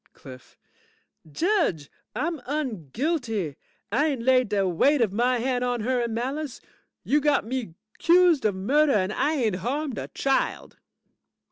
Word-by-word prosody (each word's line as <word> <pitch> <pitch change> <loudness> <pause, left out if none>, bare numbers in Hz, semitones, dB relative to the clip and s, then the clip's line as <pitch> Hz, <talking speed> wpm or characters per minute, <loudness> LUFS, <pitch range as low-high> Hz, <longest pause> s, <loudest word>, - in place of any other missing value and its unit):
CLIFF 130 -2 -14 0.7
Judge, 325 - 0 0.2
I'm 330 -1 -2
unguilty! 235 - -2 0.4
I 295 +3 +2
ain't 270 -6 -2
laid 255 -2 +3
de 200 -2 +1
weight 275 - +3
of 220 -5 +1
my 245 +3 +2
hand 250 +1 -1
on 245 -2 -1
her 250 +2 0
in 235 -1 -2
malice. 270 +4 -3 0.4
You 295 +1 +2
got 290 -4 +2
me 230 -8 -4 0.2
'cused 345 -3 +4
of 205 -3 +2
murder 280 +10 +2
and 200 0 +1
I 285 +7 +1
ain't 220 -9 0
harmed 265 - -3
a - - -5
child. 270 -1 -2
250 Hz, 145 wpm, -25 LUFS, 210-295 Hz, 0.7 s, cused